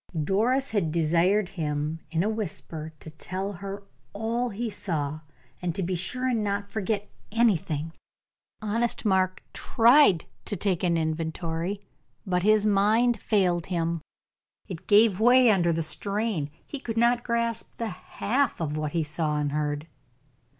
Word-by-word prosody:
Doris 230 - +1
had 195 -8 0
desired 170 +5 +2
him, 155 -3 -3
in 165 +1 0
a - - 0
whisper, 165 -7 -4
to 160 - -9
tell 185 +5 -4
her 195 +2 -7 0.3
all 230 +4 -1
he 230 +3 -3
saw, 155 -8 -3 0.4
and 175 -2 -2
to 195 - -1
be 180 +2 -1
sure 250 +9 -1
and 235 -4 +1
not 200 0 -2
forget 210 -1 -2 0.2
anything. 175 -9 +1 0.7
Honest 230 +3 0
Mark 185 -2 +1
tried 235 - +5 0.2
to 205 - -2
take 190 -4 0
an 170 -2 +2
inventory, 165 +3 -2 0.5
but 180 -2 0
his 215 +2 +4
mind 215 +3 +3
failed 180 -5 +1
him: 170 -2 -1 0.7
it 180 -5 -8
gave 210 -2 +5
way 245 +1 +6
under 175 -4 +3
the 165 0 0
strain; 200 -2 -1 0.2
he 285 - -5
could 230 -4 -5
not 240 +1 +3
grasp 235 -1 -2
the 230 -1 -3
half 245 +7 -1
what 155 -2 -2
he 165 -2 +1
saw 150 0 -1
and 145 -1 -1
heard. 150 0 -2
195 Hz, 145 wpm, -26 LUFS, 165-220 Hz, 0.7 s, way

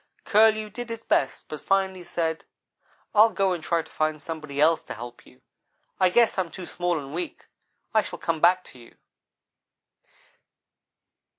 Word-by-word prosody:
"Curlew 215 0 +4
did 240 0 -7
his 230 0 -6
best 135 - 0
but 155 - -7
finally 190 -1 0
said: 165 -2 -2 0.7
'I'll 220 +1 +7
go 195 -2 +1
and 170 -3 -5
try 165 0 0
to - - -19
find 155 0 -1
somebody 150 -2 -6
else 160 +2 +4
to - - -8
help 120 +2 -10
you. - - -20 0.6
I 185 - +5
guess 230 +1 +3
I - - +5
am 175 - -5
too 185 +1 -8
small 175 -1 -1
and 140 -1 -7
weak. 175 +2 -5 0.5
I 220 - +5
shall - - -7
come 165 -2 -2
back 180 +2 +5
to 125 - -13
you.' 120 - -17
175 Hz, 170 wpm, -26 LUFS, 155-195 Hz, 0.7 s, I'll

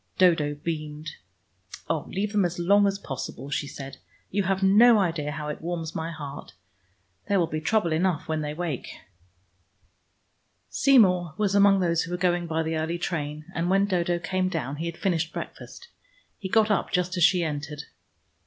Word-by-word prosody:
Dodo 160 -5 +3
beamed. 155 0 -5 0.8
"Oh, - - -1
leave 200 +2 -2
them 210 -2 +2
as 175 -1 -1
long 200 +4 +4
as 195 0 0
possible," 135 -4 -6
she 145 - -1
said. 135 -1 -8 0.3
"You 200 - +1
have 195 +1 0
no 220 +4 +7
idea 165 -6 0
how 150 +1 -5
it 150 - -5
warms 165 -1 -4
my 160 +1 -3
heart. 145 -3 -8 0.7
There 200 -1 +2
will 170 - +3
be 155 -1 -4
trouble 190 0 +1
enough 170 0 0
when 160 -1 -1
they 150 0 -3
awake." 160 -5 -4 1.8
Seymour 180 - +4
was 205 -2 +1
among 200 -1 +5
those 170 -2 +2
who 170 - -5
were 180 - -1
going 175 -1 +1
by 160 0 -1
the 160 0 -2
early 160 +2 -2
train, 155 -4 -4
and 170 +1 -1
when 195 +1 +3
Dodo 175 -3 0
came 185 +2 -1
down 140 -5 -3
he 165 +2 -3
had 170 0 -6
finished 170 -4 0
breakfast. - - -8 0.5
He 190 - -5
got 220 +1 +3
up 205 - +1
just 180 +1 0
as 175 - +1
she 180 0 +5
entered. 150 -1 -4
170 Hz, 180 wpm, -26 LUFS, 155-190 Hz, 1.8 s, no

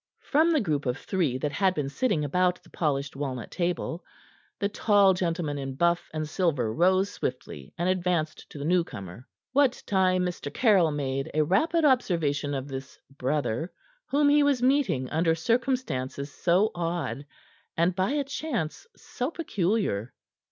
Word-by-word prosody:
From 315 +3 +3
the 310 -4 +3
group 150 - -1
of 125 +2 0
three 165 -10 -1
that 145 +2 -2
had 190 +2 +1
been 145 -2 -1
sitting 160 - 0
about 180 +4 +1
the 170 - -20
polished 140 -3 -1
walnut 135 -3 -4
table, 175 -1 -2 0.5
the 200 - 0
tall 205 -1 +4
gentleman 170 -5 -2
in 135 -1 -5
buff 170 +3 +1
and 155 -1 -3
silver 150 - 0
rose 185 - +3
swiftly, 70 -2 -5
and 175 - 0
advanced 180 -4 -1
to - - -10
the 140 - -4
newcomer; 130 - -2 0.3
what 270 -2 +3
time 185 -2 +2
Mr. 175 -5 -4
Caryll 195 - +4
made 135 -2 -2
a 155 - +4
rapid 310 - +2
observation 160 - +1
of 135 0 -4
this 135 -1 -7 0.2
brother 145 +2 -1 0.4
whom 290 +1 +3
he 295 +1 +5
was 280 -4 +2
meeting 250 - +2
under 165 +1 +2
circumstances 160 - -1
so 185 +5 +2
odd 165 -7 -3 0.5
and 170 +2 +2
by 185 +4 +1
a 295 -1 +1
chance 280 - -4
so 250 +1 -4
peculiar. 195 - -1
170 Hz, 155 wpm, -27 LUFS, 145-200 Hz, 0.5 s, he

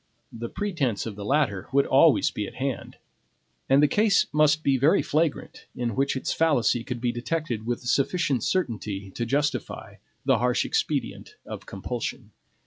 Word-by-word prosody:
The 115 0 -6
pretense 155 - -2
of 110 -3 -5
the 100 - -7
latter 105 -7 0
would 140 +1 +3
always 140 +3 +4
be 105 -5 -4
at - - -11
hand. 130 0 -4 0.7
And 140 +2 +5
the - - +6
case 205 +6 +3
must 155 0 +3
be 140 - +3
very 140 +5 +3
flagrant 155 0 -2
in 120 -3 -2
which 135 +1 +1
its 130 - -2
fallacy 130 -7 +2
could 125 -1 -5
be 120 0 0
detected 120 -2 -3
with 120 0 -2
sufficient 140 +2 +1
certainty 105 - -2
to 120 +4 -4
justify 145 +4 -2 0.3
the - - +3
harsh - - +1
expedient 435 -1 -2
of - - -8
compulsion. - - -5
135 Hz, 160 wpm, -26 LUFS, 120-155 Hz, 0.7 s, the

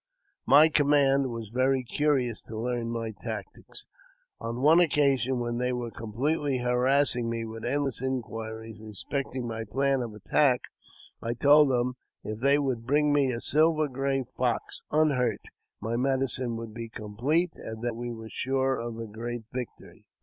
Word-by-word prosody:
My 150 +3 +8
command 140 -3 +3
were 115 -2 -5
very 130 +1 +2
curious 125 -3 0
to 110 - -7
learn 120 0 -2
my 115 -1 -3
tactics. 110 -5 -7 0.5
On 115 +3 -4
one 160 +4 +7
occasion, 135 -6 +2
when 120 0 -2
they 125 0 0
were 120 -2 -3
completely 135 +7 -1
harassing 125 0 +2
me 115 -1 -3
with 115 0 -8
endless 135 -1 0
inquiries 115 -4 -5
respecting 125 +4 -4
my 115 -1 -4
plan 135 +4 0
of 115 -3 -5
attack, 125 +5 +2 0.6
I 115 +1 -2
told 145 +2 +6
them, 125 0 0 0.3
if 110 0 -5
they 140 +3 +4
would 130 -5 -2
bring 145 +1 +3
me 140 -3 +3
a 115 - -3
silver 155 +3 +3
gray 135 0 -1
fox, 125 -1 -2
unhurt, 135 -8 +2 0.4
my 110 +3 -3
medicine 130 -2 +1
would 115 -1 -7
be 115 0 -6
complete, 125 +12 0
and 110 +1 -8
that 120 -2 -1
we 120 +1 -5
were 110 -1 -8
sure 130 +3 0
of 115 -1 -5
a 115 - -5
great 115 +2 -6
victory. 125 -2 -8
125 Hz, 155 wpm, -28 LUFS, 115-140 Hz, 0.6 s, My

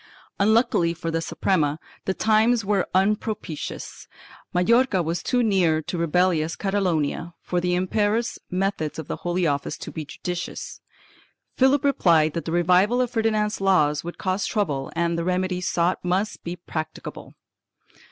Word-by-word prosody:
Unluckily 210 -5 +3
for 165 0 -4
the 165 0 -1
Suprema 155 -3 0 0.3
the 190 - -1
times 220 +1 +3
were 200 -2 +1
unpropitious. 200 -4 -2 0.4
Majorca 200 +1 +3
was 165 +1 -2
too 250 -1 +1
near 180 -7 +3
to 180 - -4
rebellious 170 -1 +1
Catalonia 175 -4 -1
for 180 -1 -1
the 180 0 +1
imperious 210 +5 0
methods 185 -4 -1
of 160 - -6
the - - -4
Holy 175 0 -1
Office 140 -2 -1
to - - -8
be 160 - -5
judicious. 175 +4 -6 0.7
Philip 265 +1 +3
replied 165 - +3
that 170 - -4
the 160 - -3
revival 180 +7 +3
of 250 -1 0
Ferdinand's 220 -3 0
laws 150 -7 +3
would 175 +1 -7
cause 190 +1 -1
trouble 150 -11 -1
and 170 0 0
the - - -1
remedy 180 0 -1
sought 175 0 0
must 185 +4 -1
be 170 +1 -4
practicable. 155 -3 -7
180 Hz, 145 wpm, -24 LUFS, 165-210 Hz, 0.7 s, Unluckily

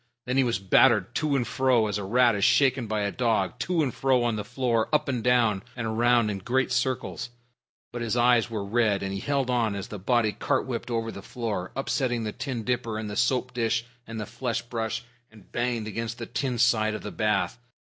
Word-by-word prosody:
Then 125 +1 -1
he 135 - +4
was 120 -5 +1
battered 105 +3 +4
to 150 0 0
and 120 -3 0
fro 130 -4 +2
as 105 -1 -2
a - - -4
rat 120 +4 +4
is 100 -1 -1
shaken 130 -2 +3
by 105 0 -1
a 100 0 -1
dog 115 -3 0
to 170 +4 +1
and 130 - -2
fro 130 -2 +2
on 120 -2 +1
the 105 - -3
floor, 120 -2 0
up 150 - +2
and 125 -5 -2
down, 115 -5 +3
and 120 -2 -4
around 115 0 +2
in 100 - -4
great 130 +7 0
circles, 125 -1 -1 0.6
but 120 - -5
his 115 0 -1
eyes 120 -1 +4
were 110 -3 -3
red 105 -2 +1
and 95 0 -3
he 100 - -3
held 135 +1 0
on 115 -4 +1
as 100 - -6
the 105 - -6
body 115 +2 +2
cart - - -1
whipped 125 -2 -4
over 115 -1 -1
the 100 - -8
floor, 105 -4 -4
upsetting 130 -3 -1
the 105 - -2
tin 125 -1 -4
dipper 115 -1 -1
and 110 -1 -4
the - - -5
soap 125 +2 +1
dish 115 -1 0 0.2
and 115 -1 -6
the 105 - -3
flesh 120 +1 -3
brush, 115 -1 -3 0.3
and 110 -4 -18
banged 120 -2 -1
against 115 +2 -4
the 120 - -5
tin 125 +1 -2
side 110 -2 +3
of - - -7
the 105 - -5
bath. 105 +2 0
115 Hz, 225 wpm, -26 LUFS, 110-125 Hz, 0.6 s, he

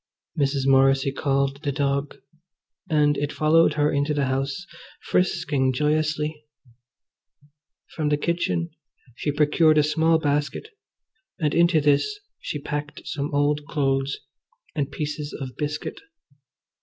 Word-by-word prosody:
Mrs. 140 -2 0
Morrissy 135 0 +4
called 140 0 0
the 145 -3 -1
dog, 140 0 -1 0.7
and 150 -2 +3
it 145 0 -2
followed 155 0 +3
her 150 0 +2
into 145 +1 0
the 145 -1 +1
house, 135 +6 -2 0.4
frisking 145 -7 +1
joyously. 150 +1 0 1.5
From 155 -2 0
the 150 - +2
kitchen 170 +1 -1 0.4
she 145 +5 -2
procured 155 +2 +3
a 150 - +5
small 160 +2 +3
basket, 145 - -1 0.7
and 150 -3 0
into 170 0 +4
this 150 - +2 0.2
she - - -4
packed 150 +1 -5
some 145 0 -3
old 145 +1 +1
cloths 135 -1 0 0.6
and 140 -3 -1
pieces 150 0 -4
of 130 -2 -6
biscuit. 150 0 -4
150 Hz, 120 wpm, -24 LUFS, 140-155 Hz, 1.5 s, a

